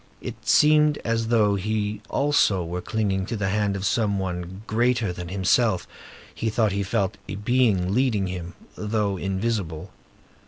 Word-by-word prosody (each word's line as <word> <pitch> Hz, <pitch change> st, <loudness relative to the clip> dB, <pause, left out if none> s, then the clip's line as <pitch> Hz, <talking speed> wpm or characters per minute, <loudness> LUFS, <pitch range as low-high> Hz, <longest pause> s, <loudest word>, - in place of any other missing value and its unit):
It -, -, -8 dB
seemed 150 Hz, 0 st, +5 dB
as 115 Hz, -1 st, 0 dB
though 110 Hz, -3 st, +3 dB
he 105 Hz, +1 st, -2 dB
also 125 Hz, -11 st, +2 dB
were 90 Hz, +2 st, -4 dB
clinging 95 Hz, -3 st, -1 dB
to 115 Hz, -, -3 dB
the 100 Hz, -2 st, -1 dB
hand 100 Hz, 0 st, 0 dB
of 95 Hz, 0 st, -3 dB
some 105 Hz, -3 st, +1 dB
one 90 Hz, +1 st, -4 dB
greater 115 Hz, -3 st, +1 dB
than 90 Hz, 0 st, -7 dB
himself; 95 Hz, +3 st, +1 dB, 0.5 s
he 115 Hz, -, -2 dB
thought 110 Hz, -1 st, +1 dB
he 100 Hz, +1 st, -1 dB
felt 100 Hz, -1 st, -1 dB
a 100 Hz, -, -3 dB
being 105 Hz, -4 st, +1 dB
leading 115 Hz, -5 st, +2 dB
him, 90 Hz, -1 st, -6 dB, 0.2 s
though 105 Hz, -2 st, -1 dB
invisible. 95 Hz, -3 st, -2 dB
105 Hz, 155 wpm, -24 LUFS, 95-115 Hz, 0.5 s, seemed